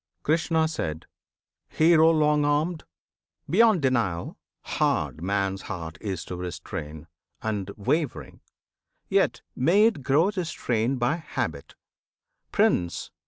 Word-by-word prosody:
Krishna. 160 +1 +2 1.0
Hero 160 0 +5
long 150 -2 +3
armed! 155 +3 0 0.6
beyond 215 -3 +4
denial, 115 -10 0 0.3
hard 80 - -1
Man's 95 +1 -1
heart 80 -3 -7
is 95 -5 -4
to 90 - -6
restrain, 80 -3 -6 0.4
and 105 -3 -2
wavering; 140 +7 -2 0.7
Yet - - +1
may 180 +11 +4
it 220 -10 +1
grow 145 +9 +3
restrained 130 - -1
by 125 +6 +1
habit, 120 - -5 0.8
Prince! 85 -2 +1
130 Hz, 100 wpm, -26 LUFS, 95-160 Hz, 1.0 s, Hero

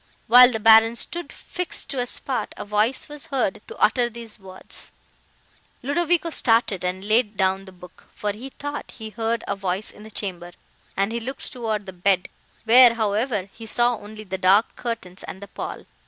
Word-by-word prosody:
While 245 +1 +9
the 220 - -2
Baron 225 +1 +6
stood, 345 +8 -3
fixed 360 -1 -4
to 275 - -4
the 245 0 0
spot, 250 -3 -1
a - - -6
voice 210 +5 +1
was 295 -1 -9
heard 245 -8 -1
to - - -10
utter 240 +2 +2
these 230 -2 -11
words:—" 190 -1 -9 0.9
[Ludovico 335 +4 +1
started, 225 - +2
and 180 +1 -3
laid 215 -1 +2
down 190 0 +1
the 190 - -11
book, 180 0 -16
for 210 - -2
he 235 +6 -8
thought 290 +2 -6
he 220 -2 -8
heard 230 0 -2
a - - -1
voice 195 +1 -3
in - - -16
the 215 - -11
chamber, 175 -4 -5 0.4
and 195 +2 +1
he 235 - -2
looked 265 +5 -6
toward 220 -5 -3
the 190 - -8
bed, 185 0 +1 0.3
where, 235 +1 +7
however, 215 -1 -1
he 225 -1 -10
saw 240 +2 +2
only 215 0 -10
the 190 -2 -5
dark 195 +4 +4
curtains 230 -7 -5
and 190 - -8
the 200 - -9
pall. - - -7
220 Hz, 185 wpm, -23 LUFS, 195-245 Hz, 0.9 s, While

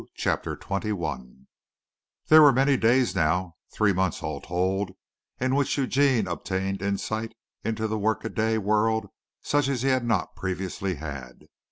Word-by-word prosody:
CHAPTER - - -1
XXI 80 - -4 0.8
There 155 0 +8
were 145 -2 +8
many 135 +2 +3
days 125 +1 +3
now, 85 +2 0
three 105 -2 +2
months 95 -1 -1
all - - -4
told, 95 +2 -1 0.5
in 130 +1 0
which 140 +1 +1
Eugene 135 -4 +2
obtained 95 +1 -3
insight 110 +3 -2 0.3
into 110 0 -1
the 110 0 -2
workaday 110 +1 0
world 110 +2 +1 0.3
such 145 -1 +1
as 130 -3 -1
he 135 - +2
had 130 -2 +2
not 110 -6 -1
previously 95 0 -3
had. 70 -4 -8
105 Hz, 140 wpm, -26 LUFS, 95-120 Hz, 0.8 s, There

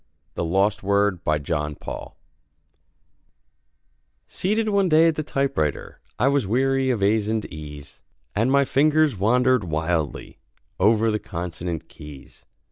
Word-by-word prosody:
THE - - -3
LOST 95 +5 +1
WORD 100 -2 +1
BY 75 0 +1
JOHN 75 0 -3
PAUL - - -8 2.1
Seated 215 +3 -1
one 200 -3 +2
day 160 +1 +5
at - - 0
the 155 - -2
typewriter, 135 - -2 0.2
I 125 - +2
was 140 -6 +1
weary 135 +4 +1
of 115 -6 0
a's 105 +1 +2
and 110 -1 -1
e's, 75 -2 -10 0.3
And 115 +5 +1
my 140 0 +4
fingers 150 0 +3
wandered 125 +4 +2
wildly, 80 -2 -3 0.4
Over 110 +3 +3
the 105 - -1
consonant 85 -2 -5
keys. 75 -2 -13
105 Hz, 130 wpm, -23 LUFS, 85-135 Hz, 2.1 s, day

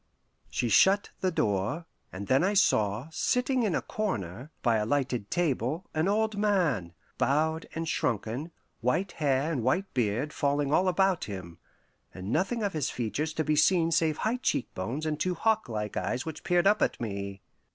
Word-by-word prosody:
She 125 - -1
shut 190 - +4
the 190 - +1
door, 105 - -1 0.3
and 95 +2 -6
then 130 - +3
I 200 +3 +1
saw, 110 - +2
sitting 250 +8 +1
in 210 -7 +1
a - - -1
corner, 125 - -3
by 115 -3 +3
a 105 - 0
lighted 130 -6 -1
table, 160 - 0
an 155 +3 +1
old 215 +1 +1
man, 165 - +1 0.3
bowed 160 +3 +1
and 165 0 -3
shrunken, 120 - -1 0.3
white 150 - 0
hair 145 -1 0
and 140 -7 -1
white 180 - 0
beard 125 +4 0
falling 145 0 0
all 185 +4 +3
about 190 -1 +2
him, 95 -5 -8 0.6
and 95 +3 -5
nothing 195 - 0
of 200 - -1
his 155 -4 -1
features 135 +7 -2
to 155 - -1
be 155 0 +1
seen 165 +2 +4
save 160 -2 +2
high 225 +3 0
cheek 145 - -1
bones 120 +12 -3
and 155 -1 -1
two 180 +1 0
hawklike 120 - 0
eyes 125 +1 -2
which 160 -1 -6
peered 175 0 +2
up 210 +2 +4
at - - +1
me. 100 -3 -5
150 Hz, 175 wpm, -29 LUFS, 115-185 Hz, 0.6 s, shut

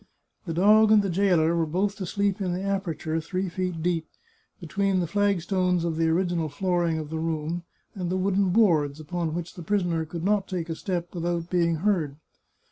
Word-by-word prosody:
The 165 - -2
dog 215 +4 +5
and 210 -2 +6
the 195 - -1
jailer 170 -3 +3
were 165 -1 +1
both 195 +6 -1
to 190 -3 -4
sleep 200 +1 0
in 180 -2 -1
the 185 +2 -3
aperture, 175 -5 -2
three 185 +3 -3
feet 180 -2 -3
deep, 165 -2 0 0.5
between 195 +3 0
the 175 - 0
flag 200 +1 +1
stones 180 -1 +1
of 165 -2 -1
the 165 0 +1
original 170 -1 0
flooring 175 +1 0
of 155 -1 -5
the 160 - -2
room 165 +1 -2 0.3
and 180 -3 -4
the 185 - 0
wooden 195 0 +1
boards, 160 -8 +3
upon 160 +1 -3
which 170 -1 -5
the 175 - -9
prisoner 175 -2 0
could 165 +1 -6
not 205 0 +1
take 175 -3 -4
a 165 - -2
step 175 -1 -3
without 170 -1 -2
being 170 -2 +2
heard. 165 -9 +1
175 Hz, 200 wpm, -26 LUFS, 165-195 Hz, 0.5 s, and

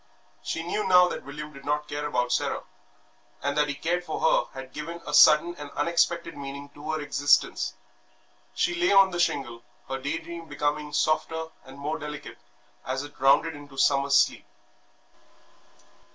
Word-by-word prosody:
She 165 - -3
knew 190 +4 -2
now 180 -1 +7
that - - -5
William 150 +2 -8
did 140 -1 -12
not 150 +1 -1
care 145 0 -3
about 125 -3 0
Sarah; - - 0 0.8
and 140 0 -1
that 150 0 +2
he 145 - -3
cared 175 +4 -1
for 160 - -4
her 145 -3 +1
had 130 0 -10
given 165 +3 -6
a 150 - -6
sudden 155 +3 +7
and 145 -1 -7
unexpected 170 +2 +1
meaning 140 0 -7
to 145 +2 -10
her 155 0 -1
existence. 145 -1 +2 0.8
She - - +1
lay 350 0 +1
on 195 -1 +6
the 175 - -3
shingle, 130 -8 -1 0.3
her 135 0 -3
day 145 +4 -2
dream 165 0 -8
becoming 150 0 -2
softer 160 +1 0 0.2
and 130 +1 -12
more 150 +3 -3
delicate 150 -1 -8 0.4
as 130 +2 -3
it 145 0 -12
rounded 135 +5 +4
into 145 -1 -12
summer 140 0 +3
sleep. 140 - +3
150 Hz, 165 wpm, -26 LUFS, 140-165 Hz, 0.8 s, now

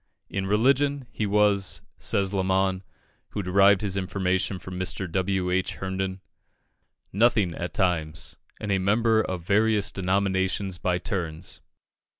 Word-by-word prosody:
In 95 -1 -2
religion, 135 +6 +2
he 105 - -2
was, 100 -1 +2 0.2
says 100 -1 0
Lamon, 95 -1 +1 0.5
who 100 - -4
derived 95 +2 +5
his 100 -3 -1
information 95 0 -1
from 90 +1 -7
Mr. 95 +1 -3
W. 95 0 0
H. 95 0 0
Herndon, 95 0 -3 0.9
"nothing 105 -4 +3
at 85 +2 -5
times, 80 -5 -1 0.2
and 105 - -3
a 95 - +2
member 110 +3 +3
of 90 -5 -4
various 105 +2 +2
denominations 95 0 0
by 90 -2 +1
turns." 90 -2 -5
95 Hz, 130 wpm, -26 LUFS, 95-100 Hz, 0.9 s, derived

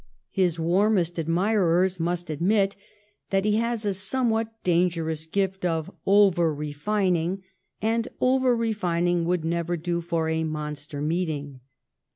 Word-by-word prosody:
His 180 -4 +1
warmest 175 0 +2
admirers 180 +1 +2
must 175 0 -2
admit 195 +6 +1 0.5
that 195 0 +1
he 210 0 +2
has 230 -1 -1
a 200 - +1
somewhat 225 +3 0
dangerous 165 -3 0
gift 190 +2 -1
of 165 -3 -1 0.2
over 190 -5 +4
refining, 180 +4 -1 0.4
and 225 +1 +1
over 255 -1 +3
refining 175 -6 0
would 175 -2 0
never 170 +1 -1
do 170 +1 -2
for 165 -1 -1
a 160 0 0
monster 150 -2 -5
meeting. 150 -4 -2
175 Hz, 125 wpm, -25 LUFS, 165-200 Hz, 0.5 s, over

